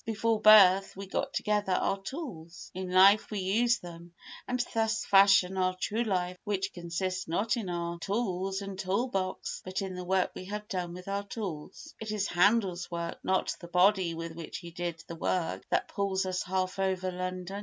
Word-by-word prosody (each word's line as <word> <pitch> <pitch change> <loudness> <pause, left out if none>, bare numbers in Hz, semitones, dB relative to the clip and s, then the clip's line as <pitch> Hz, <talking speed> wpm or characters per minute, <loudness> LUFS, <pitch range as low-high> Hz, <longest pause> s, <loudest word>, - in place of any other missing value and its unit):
Before 225 0 0
birth 195 -3 +7
we 195 - -6
get 190 - -2
together 210 -2 0
our 195 +2 0
tools, 195 - -8
in 185 0 -5
life 195 +3 +6
we 210 - -4
use 220 +5 +2
them, 170 -2 -11 0.3
and 250 0 -1
thus 225 -1 0
fashion 195 -1 +5
our 185 0 +1
true 220 +5 -1
life 180 -4 -1
which 195 -2 -2
consists 180 +2 -3
not 205 +6 0
in 220 -6 -4
our 170 -1 -3
tools 195 -1 -2
and 195 -1 -7
tool 195 +7 0
box 185 -4 -3
but 185 0 -4
in 190 -1 -5
the 180 0 -6
work 185 +1 +1
we 185 - -8
have 210 +2 -6
done 180 -3 -4
with 180 +1 -10
our 200 0 -1
tools. 190 -9 -7
It 220 -1 -5
is 210 -2 -1
Handel's 185 -1 +2
work, 170 -1 -4
not 190 0 0
the 170 - -10
body 180 -1 +3
with 165 0 -5
which 165 -1 -7
he 170 -4 -9
did 170 -1 -5
the - - -6
work, 170 +1 -1
that - - +1
pulls 195 -1 -1
us 185 -1 -1
half 185 +1 -2
over 190 -1 0
London. 185 +1 -4
190 Hz, 190 wpm, -30 LUFS, 180-205 Hz, 0.3 s, birth